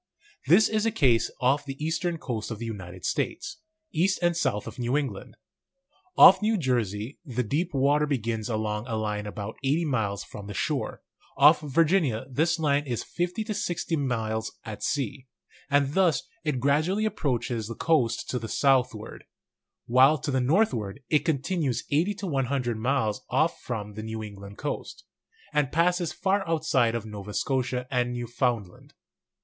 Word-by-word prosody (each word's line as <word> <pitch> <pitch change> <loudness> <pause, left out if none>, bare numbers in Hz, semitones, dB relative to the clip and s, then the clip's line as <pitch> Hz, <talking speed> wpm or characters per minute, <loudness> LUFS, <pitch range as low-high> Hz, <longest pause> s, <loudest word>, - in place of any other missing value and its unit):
This 195 +6 +6
is 215 0 0
the 225 - +2
case 125 - +3
off 135 +3 +3
the 135 -1 -7
eastern 165 +2 -1
coast 115 -8 -4
of 115 - -4
the 115 - -6
United 95 -5 -7
States, 325 -2 -2 0.3
east 185 +4 +2
and 175 0 +3
south 105 -11 0
of 115 +3 -9
New 125 +3 +1
England. 130 -10 -4 0.8
Off 190 +1 +9
New 215 +1 +2
Jersey 120 - -1
the 125 -5 -2
deep 160 - -1
water 145 +2 +2
begins 115 -5 -2
along 110 0 -2
a 115 - -2
line 105 -1 -2
about 105 +1 -6
80 150 +5 +1
miles 105 -8 -1
from 100 -1 -10
the 105 - -7
shore; - - -2 0.3
off 150 +3 +7
Virginia 150 - +2
this 160 +6 +1
line 145 -2 +1
is 120 -3 -2
50 180 +5 -2
to 215 0 -3
60 175 -4 -2
miles 110 -6 -2
at 110 -2 -7
sea; 135 -2 -2 0.4
and 140 0 +2
thus 175 -8 +3 0.2
it 150 -5 -1
gradually 155 - +2
approaches 120 - -1
the 115 - -6
coast 125 -8 +1
to 125 - -1
the 115 -1 -6
southward; 130 -6 +1 0.6
while 130 +5 +5
to 145 - -3
the 130 -1 +1
northward 130 - +1
it 150 - +4
continues 150 -3 0
80 170 +8 +2
to 200 - -6
100 135 -6 -1
miles 110 -2 0
off 155 +6 +1
from 105 -4 -5
the 110 - -6
New 110 0 -5
England 100 -1 -10
coast, - - -5 0.5
and 150 -2 +1
passes 175 +1 +2
far 195 +1 0
outside 155 -8 +2
of 115 -2 -3
Nova 105 -1 -7
Scotia 130 -2 -1
and 125 -1 0
Newfoundland. 120 -5 -3
130 Hz, 165 wpm, -27 LUFS, 115-160 Hz, 0.8 s, Off